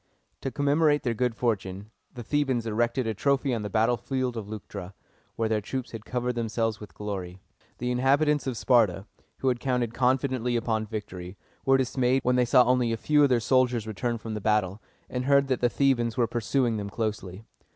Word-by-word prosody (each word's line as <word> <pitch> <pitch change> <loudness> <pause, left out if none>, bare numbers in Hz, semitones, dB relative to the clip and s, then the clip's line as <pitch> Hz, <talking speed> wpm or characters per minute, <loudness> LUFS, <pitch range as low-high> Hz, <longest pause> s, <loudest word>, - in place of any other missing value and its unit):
To 135 - -2
commemorate 145 +2 +2
their 120 - 0
good 125 0 -1
fortune, 105 -3 -2 0.2
the 120 - -8
Thebans 130 -3 0
erected 120 +3 0
a 110 - -1
trophy 140 +4 +1
on 115 - -1
the 105 - -4
battlefield 120 +4 0
of 105 -3 -6
Leuctra, 100 -3 -8 0.4
where 115 - 0
their 110 -1 0
troops 130 +3 -5
had 110 -2 -8
covered 125 0 -2
themselves 115 -1 -1
with 105 - -11
glory. 95 -4 -5 0.4
The 125 +1 -2
inhabitants 140 +4 +2
of 125 -3 -2
Sparta, 105 -8 +3 0.4
who 135 - +2
had 125 -1 0
counted 125 -3 -1
confidently 125 -1 +1
upon 110 -2 -1
victory, 95 -4 -7 0.3
were 135 0 +6
dismayed 130 0 +1
when 125 0 +2
they 125 0 +3
saw 125 +1 +6
only 125 -1 +2
a 115 - -1
few 150 +6 +3
of 145 - +5
their 125 -2 +3
soldiers 125 -2 +2
return 115 +2 -2
from 110 0 -6
the 105 - -4
battle, 105 -1 0 0.3
and 125 0 -3
heard 140 0 +4
that 130 - 0
the 120 - +3
Thebans 120 -3 +1
were 120 - +3
pursuing 120 +1 0
them 100 -1 -4
closely. 105 -2 -4
120 Hz, 195 wpm, -27 LUFS, 110-130 Hz, 0.4 s, were